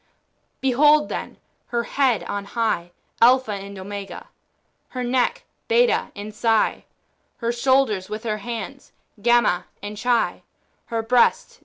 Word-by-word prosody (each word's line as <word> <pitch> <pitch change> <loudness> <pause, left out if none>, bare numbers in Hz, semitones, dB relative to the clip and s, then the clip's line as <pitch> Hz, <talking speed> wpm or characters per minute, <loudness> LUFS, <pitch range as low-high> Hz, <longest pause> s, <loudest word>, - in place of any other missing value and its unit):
Behold, 295 +3 +4
then, - - -5 0.3
her 235 -1 -1
head 255 -4 +1
on 200 0 -4
high. 215 -6 -1 0.3
Alpha 250 -1 +5
and 200 0 -6
Omega; 200 +1 -7 0.6
her 250 -1 -4
neck, 245 0 0 0.2
Beta 475 +1 +2
and 210 +1 -7
Psi; 225 0 +1 0.5
her 235 -1 -1
shoulders 240 -6 +1
with 215 +1 -5
her 215 -2 -2
hands, 235 +5 -7 0.3
Gamma 235 -6 +3 0.2
and 205 +1 -6
Chi; 245 -2 +1 0.4
her 230 -1 -3
breast. 240 +1 +2
235 Hz, 125 wpm, -23 LUFS, 205-255 Hz, 0.6 s, Alpha